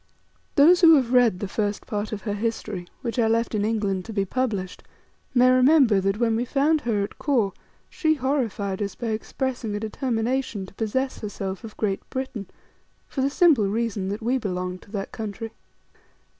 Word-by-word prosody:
Those 340 Hz, +6 st, +6 dB
who 325 Hz, -2 st, +9 dB
have 255 Hz, -4 st, +1 dB
read 245 Hz, -7 st, +5 dB
the 200 Hz, -, -2 dB
first 205 Hz, +1 st, -2 dB
part 210 Hz, 0 st, -3 dB
of 210 Hz, -2 st, -5 dB
her 205 Hz, -, -2 dB
history, 205 Hz, -4 st, -3 dB, 0.2 s
which 240 Hz, 0 st, -2 dB
I 225 Hz, -, +4 dB
left 230 Hz, +1 st, +1 dB
in 210 Hz, -1 st, 0 dB
England 205 Hz, -4 st, 0 dB
to 225 Hz, -, -7 dB
be 200 Hz, -2 st, 0 dB
published, 205 Hz, -5 st, -2 dB, 0.5 s
may 250 Hz, +1 st, +6 dB
remember 255 Hz, -5 st, +5 dB
that 195 Hz, +1 st, 0 dB
when 225 Hz, -1 st, +2 dB
we 230 Hz, -, 0 dB
found 290 Hz, +5 st, +2 dB
her 215 Hz, -4 st, 0 dB
at 200 Hz, -, -7 dB
Kôr, 235 Hz, -9 st, +1 dB, 0.3 s
She 315 Hz, -1 st, +1 dB
horrified 235 Hz, -8 st, -1 dB
us 200 Hz, -1 st, -3 dB
by 235 Hz, -, -4 dB
expressing 230 Hz, 0 st, -3 dB
a -, -, -2 dB
determination 230 Hz, -1 st, -2 dB
to 190 Hz, -, -15 dB
possess 255 Hz, +6 st, -2 dB
herself 195 Hz, -1 st, -5 dB
of 220 Hz, -2 st, -10 dB
Great 200 Hz, -3 st, -1 dB
Britain, 260 Hz, -7 st, -4 dB, 0.6 s
for 265 Hz, -, -3 dB
the 270 Hz, -, +2 dB
simple 285 Hz, -, +4 dB
reason 210 Hz, -2 st, -1 dB
that 205 Hz, +3 st, -4 dB
we 255 Hz, +3 st, +1 dB
belonged 180 Hz, -3 st, -3 dB
to 200 Hz, -, -17 dB
that 200 Hz, -2 st, -4 dB
country. 220 Hz, +1 st, -5 dB
225 Hz, 185 wpm, -24 LUFS, 200-255 Hz, 0.6 s, who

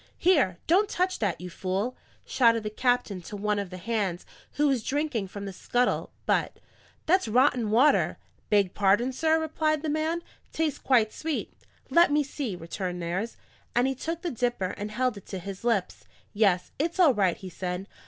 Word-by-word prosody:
"Here! 280 Hz, -, +3 dB
don't 395 Hz, +5 st, +3 dB
touch 365 Hz, +1 st, 0 dB
that, 200 Hz, -6 st, -1 dB
you 180 Hz, 0 st, -7 dB
fool!" 195 Hz, +8 st, -2 dB, 0.3 s
shouted 230 Hz, -3 st, +3 dB
the 215 Hz, -, -3 dB
captain 245 Hz, -5 st, 0 dB
to 205 Hz, +4 st, -8 dB
one 210 Hz, 0 st, 0 dB
of 200 Hz, -2 st, -4 dB
the 185 Hz, -, -8 dB
hands, 195 Hz, -3 st, -2 dB, 0.3 s
who 295 Hz, 0 st, +2 dB
was 265 Hz, -4 st, +2 dB
drinking 275 Hz, -5 st, -1 dB
from 200 Hz, +2 st, -7 dB
the 195 Hz, -, -6 dB
scuttle 245 Hz, +6 st, 0 dB
but. -, -, +1 dB, 0.5 s
"That 365 Hz, -5 st, +3 dB
water's 245 Hz, -1 st, +3 dB
rotten!" 255 Hz, +7 st, +4 dB, 0.3 s
"Beg 200 Hz, -4 st, +3 dB
pardon, 210 Hz, +6 st, +2 dB
sir," 320 Hz, +4 st, +2 dB
replied 310 Hz, -1 st, 0 dB
the 315 Hz, -, -1 dB
man. 315 Hz, +3 st, -1 dB, 0.3 s
"Tastes 315 Hz, -3 st, -1 dB
quite 225 Hz, -5 st, +3 dB
sweet." 320 Hz, -1 st, -3 dB, 0.4 s
"Let 340 Hz, -2 st, +6 dB
me 295 Hz, 0 st, +3 dB
see," 275 Hz, -7 st, -4 dB
returned 180 Hz, +1 st, -5 dB
Nares, 180 Hz, +7 st, -3 dB, 0.4 s
and 240 Hz, +1 st, +4 dB
he 270 Hz, -, +1 dB
took 330 Hz, +6 st, -5 dB
the 345 Hz, -, -1 dB
dipper 240 Hz, -6 st, -1 dB
and 205 Hz, +1 st, -5 dB
held 245 Hz, 0 st, -1 dB
it 200 Hz, -, -12 dB
to 190 Hz, -, -5 dB
his 195 Hz, +2 st, -7 dB
lips. 225 Hz, -6 st, -1 dB, 0.3 s
"Yes, 200 Hz, -4 st, +2 dB
it's 335 Hz, +5 st, -1 dB
all 325 Hz, -7 st, +6 dB
right," 195 Hz, -5 st, +1 dB
he 185 Hz, -1 st, -9 dB
said. 180 Hz, +1 st, -4 dB
230 Hz, 185 wpm, -27 LUFS, 195-295 Hz, 0.5 s, Let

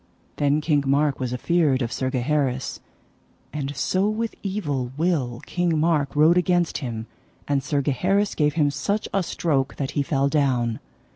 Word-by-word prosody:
Then 145 Hz, +1 st, +2 dB
King 150 Hz, -2 st, +2 dB
Mark 140 Hz, +1 st, +2 dB
was 125 Hz, -2 st, -2 dB
afeard 140 Hz, 0 st, +1 dB
of 115 Hz, -, -3 dB
Sir 130 Hz, -, -1 dB
Gaheris, 130 Hz, 0 st, -1 dB, 0.7 s
and 145 Hz, -1 st, -3 dB
so 185 Hz, +10 st, +1 dB
with 225 Hz, +1 st, -2 dB
evil 145 Hz, -11 st, -2 dB
will 145 Hz, -8 st, 0 dB
King 175 Hz, -2 st, 0 dB
Mark 150 Hz, -4 st, +1 dB
rode 160 Hz, +4 st, +5 dB
against 175 Hz, -1 st, +1 dB
him, 115 Hz, -5 st, -5 dB, 0.4 s
and 140 Hz, -1 st, +1 dB
Sir 145 Hz, 0 st, -1 dB
Gaheris 190 Hz, +9 st, +1 dB
gave 150 Hz, -1 st, +1 dB
him 150 Hz, -3 st, +2 dB
such 205 Hz, +8 st, -1 dB
a 195 Hz, -, +2 dB
stroke 145 Hz, -6 st, -1 dB
that 140 Hz, -1 st, -3 dB
he 145 Hz, -, 0 dB
fell 140 Hz, 0 st, +1 dB
down. 130 Hz, -6 st, +1 dB
145 Hz, 160 wpm, -24 LUFS, 135-170 Hz, 0.7 s, rode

